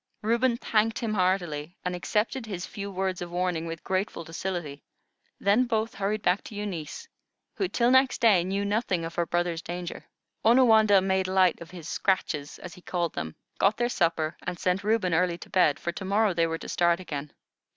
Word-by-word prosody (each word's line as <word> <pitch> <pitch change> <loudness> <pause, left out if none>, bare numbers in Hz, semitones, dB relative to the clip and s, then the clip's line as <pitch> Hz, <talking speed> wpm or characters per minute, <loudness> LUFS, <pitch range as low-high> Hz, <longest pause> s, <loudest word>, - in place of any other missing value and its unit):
Reuben 235 +2 +2
thanked 220 -1 +1
him 225 -2 -2
heartily, 180 -4 0
and 180 0 -1
accepted 220 +6 -1
his 185 -4 -4
few 200 -1 -6
words 190 -1 -2
of 175 - -5
warning 175 -2 -1
with 165 -1 -6
grateful 190 -2 -2
docility; 165 -3 -5 0.6
then 210 +6 +3
both 225 -2 -1
hurried 205 +2 -2
back 180 +3 +2
to 215 - -9
Eunice, 195 -7 -5 0.5
who 385 - -1
till 240 -7 +2
next 260 0 +4
day 205 -7 +5
knew 195 +2 -1
nothing 200 -5 0
of 165 - -6
her 170 0 -1
brother's 175 -1 -1
danger. 175 0 -6 0.4
Onawandah 220 -4 +6
made 190 -1 +1
light 185 -2 +3
of 165 - -9
his 170 -3 -9
scratches, 155 -7 -1
as 180 - -9
he 180 - -14
called 175 -2 -2
them, 80 0 -5 0.2
got 200 +2 +3
their 240 0 +1
supper, 165 -6 0
and 175 - -4
sent 180 +3 0
Reuben 210 -4 +1
early 175 +1 +2
to - - -12
bed, 180 -6 +4
for 170 - -2
to 180 - -7
morrow 205 +1 +2
they 165 -1 +2
were 165 0 -2
to - - -9
start 170 0 +2
again. 150 -5 -6
185 Hz, 195 wpm, -27 LUFS, 170-210 Hz, 0.6 s, Onawandah